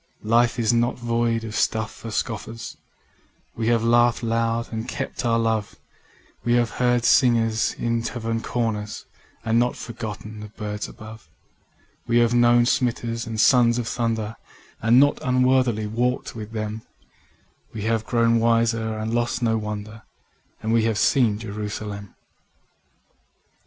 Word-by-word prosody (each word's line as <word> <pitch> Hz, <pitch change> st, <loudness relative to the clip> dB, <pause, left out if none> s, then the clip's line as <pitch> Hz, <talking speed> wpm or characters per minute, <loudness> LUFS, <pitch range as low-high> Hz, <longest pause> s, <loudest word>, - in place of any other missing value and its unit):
Life 115 Hz, +2 st, +3 dB
is 115 Hz, -1 st, +2 dB
not 120 Hz, +1 st, +1 dB
void 115 Hz, -1 st, 0 dB
or 110 Hz, -, -6 dB
stuff 110 Hz, +1 st, 0 dB
for 115 Hz, -, -9 dB
scorners: 115 Hz, +1 st, -4 dB, 0.8 s
We 110 Hz, -1 st, -2 dB
have 115 Hz, -1 st, +2 dB
laughed 120 Hz, +1 st, +3 dB
loud 115 Hz, 0 st, -1 dB
and 110 Hz, +1 st, -4 dB
kept 110 Hz, +2 st, -4 dB
our 115 Hz, -1 st, +2 dB
love, 110 Hz, -2 st, -1 dB, 0.7 s
We 120 Hz, -, +1 dB
have 120 Hz, -1 st, +2 dB
heard 120 Hz, -1 st, +1 dB
singers 115 Hz, -4 st, +3 dB
in 115 Hz, 0 st, -1 dB
tavern 115 Hz, -1 st, -3 dB
corners 110 Hz, -4 st, -3 dB, 0.4 s
And 115 Hz, +1 st, +3 dB
not 125 Hz, +1 st, +1 dB
forgotten 110 Hz, -2 st, -7 dB
the 105 Hz, -, -7 dB
birds 105 Hz, 0 st, -5 dB
above: 110 Hz, -6 st, -12 dB, 0.8 s
We 115 Hz, -, +2 dB
have 120 Hz, 0 st, +3 dB
known 120 Hz, 0 st, +5 dB
smiters 120 Hz, -2 st, -1 dB
and 110 Hz, -1 st, -4 dB
sons 120 Hz, -1 st, +5 dB
of 120 Hz, -2 st, -2 dB
thunder 110 Hz, -3 st, -2 dB, 0.4 s
And 115 Hz, +3 st, +5 dB
not 145 Hz, +1 st, +4 dB
unworthily 125 Hz, -4 st, +2 dB
walked 120 Hz, +5 st, -1 dB
with 110 Hz, -1 st, -7 dB
them, 110 Hz, 0 st, -4 dB, 0.9 s
We 105 Hz, -, -6 dB
have 110 Hz, 0 st, 0 dB
grown 115 Hz, 0 st, +2 dB
wiser 115 Hz, -1 st, +1 dB
and 110 Hz, +1 st, -3 dB
lost 120 Hz, +1 st, 0 dB
not 110 Hz, -1 st, +2 dB
wonder; 105 Hz, +1 st, -6 dB, 0.6 s
And 110 Hz, +1 st, 0 dB
we 115 Hz, -1 st, +3 dB
have 110 Hz, -2 st, 0 dB
seen 115 Hz, -1 st, +3 dB
Jerusalem. 105 Hz, -1 st, -6 dB
115 Hz, 140 wpm, -23 LUFS, 110-120 Hz, 0.9 s, known